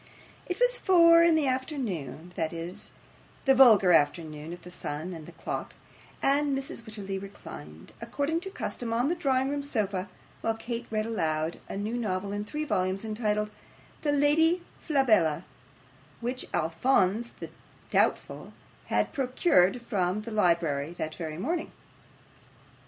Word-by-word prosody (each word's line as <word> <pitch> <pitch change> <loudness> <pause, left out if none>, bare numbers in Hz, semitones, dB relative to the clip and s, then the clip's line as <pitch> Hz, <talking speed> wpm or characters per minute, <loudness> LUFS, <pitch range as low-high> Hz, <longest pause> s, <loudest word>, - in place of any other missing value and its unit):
It 360 - -3
was - - +3
four 335 -2 +7
in 335 -1 +5
the 310 -2 +2
afternoon 215 - -3
that 160 -1 -1
is, 170 +5 -6 0.6
the 270 - +6
vulgar 225 -8 +7
afternoon 155 0 +1
of 175 - -9
the 180 - -10
sun 160 +1 -5
and 160 -2 -9
the - - -9
clock - - -5 0.5
and 280 0 +2
Mrs. 270 -3 -4
Wititterly 200 -4 -5
reclined, 80 - -11
according 285 +7 -1
to 385 +3 -6
custom, 240 - -4
on 245 +5 +2
the 345 - +1
drawing 270 -5 +1
room 285 0 -1
sofa, 205 -9 -2 0.3
while 225 - 0
Kate 235 +1 -5
read 215 -1 -1
aloud 160 -7 -1
a - - -4
new 210 +4 -2
novel 200 -3 -2
in 205 0 -3
three 300 +7 -3
volumes, 190 -4 0
entitled 210 -1 -1 0.5
'The 295 - +1
Lady 320 +5 +3 0.2
Flabella,' 225 - +3 0.8
which 250 +2 -3
Alphonse 190 +6 +1
the - - -7 0.4
doubtful - - 0 0.3
had - - 0
procured 250 - +3
from 195 -2 0
the 230 - -7
library 170 -7 +1
that 155 -2 -4
very 155 -2 -5
morning. 320 - -2
215 Hz, 145 wpm, -28 LUFS, 180-275 Hz, 0.8 s, four